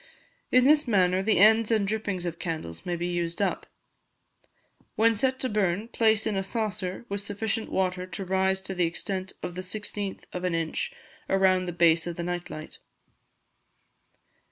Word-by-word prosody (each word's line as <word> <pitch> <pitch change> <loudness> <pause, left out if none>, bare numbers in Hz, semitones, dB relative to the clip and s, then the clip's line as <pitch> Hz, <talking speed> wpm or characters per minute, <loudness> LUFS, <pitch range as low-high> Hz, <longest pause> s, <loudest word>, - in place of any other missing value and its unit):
In 255 0 +5
this 300 0 +5
manner, 185 -4 +3
the 215 +2 +2
ends 220 +2 +6
and 215 -3 +2
drippings 205 -4 -2
of 170 -1 -4
candles 160 - -5
may 175 - 0
be 170 +1 -3
used 175 -1 -2
up. 200 - -1 1.3
When 225 +1 +4
set 260 +4 +1
to 260 - +2
burn, 210 0 0
place 220 -2 +2
in 220 -2 0
a 195 - +1
saucer, 205 -1 -3
with 200 0 -3
sufficient 215 +2 -3
water 185 -1 0
to 190 +1 -5
rise 190 +1 +1
to 190 - -4
the 180 -2 +2
extent 190 +2 -4
of 180 - -4
the 185 - -4
16th 205 +1 -5
of 180 - -4
an 180 -2 0
inch 165 - -2 0.4
around 190 -1 +3
the - - -1
base 170 -1 +3
of 170 - -4
the 170 - -4
night 175 0 -3
light. 155 0 -9
190 Hz, 175 wpm, -27 LUFS, 175-215 Hz, 1.3 s, ends